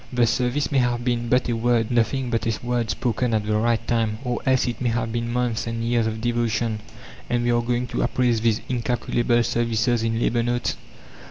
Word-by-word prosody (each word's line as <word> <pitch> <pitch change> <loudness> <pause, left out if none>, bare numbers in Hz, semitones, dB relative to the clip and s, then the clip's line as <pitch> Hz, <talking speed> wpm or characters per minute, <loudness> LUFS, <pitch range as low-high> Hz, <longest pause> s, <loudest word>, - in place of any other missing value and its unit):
The 125 -1 +3
service 125 +5 0
may 140 - +3
have 120 -1 0
been 120 -1 0
but 125 +1 +2
a 120 - 0
word, 115 0 +1
nothing 120 +2 +1
but 115 -1 0
a 115 +1 -2
word 120 -2 0
spoken 115 +3 0
at 105 -1 0
the 105 0 0
right 115 +1 +1
time, 115 -2 0
or 125 -2 -2
else 130 -1 +3
it 120 - -4
may 125 - +1
have 115 -1 -1
been 115 0 -2
months 120 -2 -1
and 115 0 -3
years 115 -1 +1
of 110 0 -4
devotion, 115 -2 0 0.5
and 120 0 +1
we 120 - +2
are 120 0 +2
going 120 +1 -1
to - - -2
appraise 120 -3 +1
these 115 0 +1
"incalculable" 120 0 0
services 115 0 +1
in 115 0 0
"labour 120 0 +1
notes"? 120 +1 -1
120 Hz, 210 wpm, -23 LUFS, 115-120 Hz, 0.5 s, The